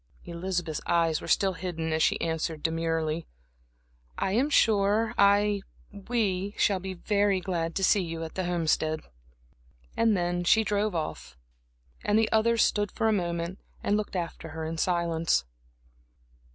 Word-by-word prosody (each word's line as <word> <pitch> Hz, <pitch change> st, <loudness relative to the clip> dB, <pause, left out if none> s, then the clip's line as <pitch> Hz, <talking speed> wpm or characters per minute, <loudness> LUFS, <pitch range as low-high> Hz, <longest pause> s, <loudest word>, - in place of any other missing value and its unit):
Elizabeth's 175 Hz, -2 st, -3 dB
eyes 165 Hz, -2 st, +2 dB
were -, -, -8 dB
still 195 Hz, -1 st, +2 dB
hidden 165 Hz, -3 st, -3 dB
as 160 Hz, -, 0 dB
she -, -, +2 dB
answered 160 Hz, -1 st, -2 dB
demurely: 165 Hz, 0 st, -1 dB, 0.9 s
"I -, -, 0 dB
am 250 Hz, +8 st, +2 dB
sure 215 Hz, -3 st, +3 dB
I 200 Hz, 0 st, +4 dB, 0.3 s
we 205 Hz, -2 st, -2 dB
shall 195 Hz, -2 st, +2 dB
be 190 Hz, 0 st, -6 dB
very 200 Hz, +1 st, +1 dB
glad 170 Hz, -3 st, -3 dB
to 195 Hz, -, -1 dB
see 200 Hz, +1 st, +4 dB
you 165 Hz, -2 st, -4 dB
at 160 Hz, -, -7 dB
the 185 Hz, -, -2 dB
Homestead." 160 Hz, -2 st, 0 dB, 0.9 s
And 225 Hz, -3 st, +3 dB
then 175 Hz, 0 st, -1 dB
she 220 Hz, +6 st, +4 dB
drove 205 Hz, -2 st, 0 dB
off, 155 Hz, -, -5 dB, 0.7 s
and 210 Hz, +1 st, +2 dB
the 220 Hz, -1 st, +2 dB
others 230 Hz, +1 st, +3 dB
stood 205 Hz, -1 st, +1 dB
for 225 Hz, -, 0 dB
a 220 Hz, -, +3 dB
moment 170 Hz, -1 st, -2 dB, 0.2 s
and 205 Hz, -, +2 dB
looked 210 Hz, -2 st, -3 dB
after 170 Hz, -2 st, -4 dB
her 160 Hz, -, -3 dB
in 160 Hz, 0 st, -4 dB
silence. 170 Hz, -, +1 dB
180 Hz, 150 wpm, -28 LUFS, 165-205 Hz, 0.9 s, I